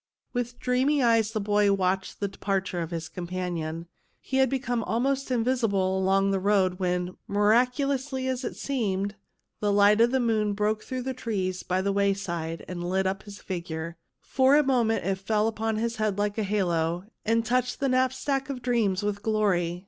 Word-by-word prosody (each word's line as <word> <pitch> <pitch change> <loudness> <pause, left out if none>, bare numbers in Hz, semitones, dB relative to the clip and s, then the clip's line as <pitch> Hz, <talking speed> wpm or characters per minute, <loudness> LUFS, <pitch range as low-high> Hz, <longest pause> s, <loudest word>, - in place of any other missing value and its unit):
With 245 0 -3
dreamy 260 +3 +2
eyes 230 -2 +4
the 220 -1 -2
boy 205 0 +2
watched 190 -1 0
the 200 - 0
de 195 - -14
parture 195 -3 -1
of 165 - -4
his 165 -1 -4
companion. 170 -2 -4 0.3
He 265 - -3
had 265 -1 +4
become 245 -3 -1
almost 270 +4 0
invisible 225 -6 +1
along 195 +1 +2
the 195 - +1
road 190 -2 +2
when, 180 0 -1
miracu 235 +7 +3
lously 265 -1 -2
as 260 0 -2
it - - -4
seemed, 205 -7 -1 0.5
the 205 -1 +1
light 205 +2 +5
of 235 - +6
the 265 +1 +1
moon 215 -4 +1
broke 210 +1 0
through 255 +1 -5
the 260 +1 -2
trees 195 -7 -2
by 185 +1 -1
the 200 0 +1
wayside 195 -5 -1
and 175 -1 -5
lit 190 +1 +1
up 190 +2 -1
his 205 -1 -11
figure. 170 -2 -5 0.3
For 265 +1 +3
a 300 - +5
moment 235 - +1
it 190 0 0
fell 210 +2 +1
upon 225 0 -1
his 230 +2 -2
head 215 -2 0
like 205 +1 -1
a - - +1
halo, 175 -3 0 0.2
and 230 +1 +1
touched 250 +1 0
the 275 - +1
knapsack 260 +2 0
of 255 -3 -5
dreams 220 -6 +1
with 205 0 -2
glory. 185 -6 +1
210 Hz, 185 wpm, -27 LUFS, 190-245 Hz, 0.5 s, of